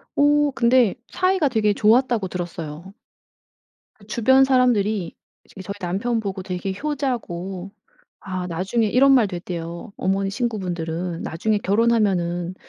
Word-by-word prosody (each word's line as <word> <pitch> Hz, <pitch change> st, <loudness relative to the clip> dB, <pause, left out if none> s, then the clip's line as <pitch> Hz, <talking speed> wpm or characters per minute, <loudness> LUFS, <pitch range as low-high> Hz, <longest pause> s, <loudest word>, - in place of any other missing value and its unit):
어 290 Hz, 0 st, +3 dB
근데 240 Hz, -3 st, +3 dB
사이가 370 Hz, -4 st, +1 dB
되게 215 Hz, -4 st, +2 dB
좋았다고 225 Hz, 0 st, +3 dB
들었어요. 170 Hz, 0 st, -6 dB, 1.0 s
그 205 Hz, -, -19 dB
주변 260 Hz, +5 st, +4 dB
사람들이 220 Hz, -8 st, +2 dB, 0.3 s
이제 190 Hz, -, -12 dB
저희 200 Hz, +2 st, -6 dB
남편보고 195 Hz, +1 st, -2 dB
되게 185 Hz, +1 st, -4 dB
효자고 200 Hz, -, -3 dB, 0.5 s
아 185 Hz, -2 st, -5 dB
나중에 190 Hz, +7 st, 0 dB
이런 265 Hz, +6 st, +4 dB
말도 215 Hz, -8 st, +3 dB
했대요. 170 Hz, +2 st, -6 dB
어머니 195 Hz, +1 st, 0 dB
친구분들은 180 Hz, -6 st, -3 dB
"나중에 210 Hz, +7 st, -1 dB
결혼하면은 195 Hz, -5 st, +1 dB
200 Hz, 300 characters per minute, -22 LUFS, 180-240 Hz, 1.0 s, 주변